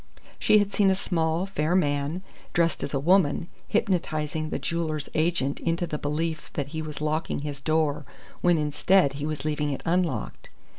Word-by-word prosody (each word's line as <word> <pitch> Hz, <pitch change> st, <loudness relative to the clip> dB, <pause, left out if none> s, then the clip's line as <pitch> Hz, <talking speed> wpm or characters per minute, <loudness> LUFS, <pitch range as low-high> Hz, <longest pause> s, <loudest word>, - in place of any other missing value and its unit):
She 215 Hz, -, +5 dB
had 205 Hz, -1 st, +1 dB
seen 200 Hz, -2 st, +4 dB
a 190 Hz, -, +3 dB
small, 165 Hz, -2 st, 0 dB
fair 175 Hz, -3 st, 0 dB
man, 145 Hz, +1 st, 0 dB, 0.3 s
dressed 170 Hz, -2 st, +2 dB
as 140 Hz, -, -3 dB
a -, -, +1 dB
woman, 170 Hz, 0 st, +3 dB, 0.2 s
hypnotizing 155 Hz, -7 st, 0 dB
the -, -, -2 dB
jewellers' 160 Hz, -3 st, -2 dB
agent 155 Hz, -4 st, +1 dB
into 170 Hz, +1 st, 0 dB
the 150 Hz, -3 st, -4 dB
belief 155 Hz, +2 st, -2 dB
that 140 Hz, -1 st, -3 dB
he 160 Hz, +1 st, -4 dB
was 150 Hz, -1 st, -6 dB
locking 155 Hz, -1 st, -1 dB
his 145 Hz, -2 st, -5 dB
door 155 Hz, -1 st, +1 dB, 0.4 s
when 175 Hz, -1 st, +4 dB
instead 150 Hz, +1 st, +3 dB
he 145 Hz, +2 st, -3 dB
was 155 Hz, -1 st, -4 dB
leaving 150 Hz, -1 st, 0 dB
it 135 Hz, -, -4 dB
unlocked. 170 Hz, -9 st, -1 dB
155 Hz, 170 wpm, -26 LUFS, 150-175 Hz, 0.4 s, She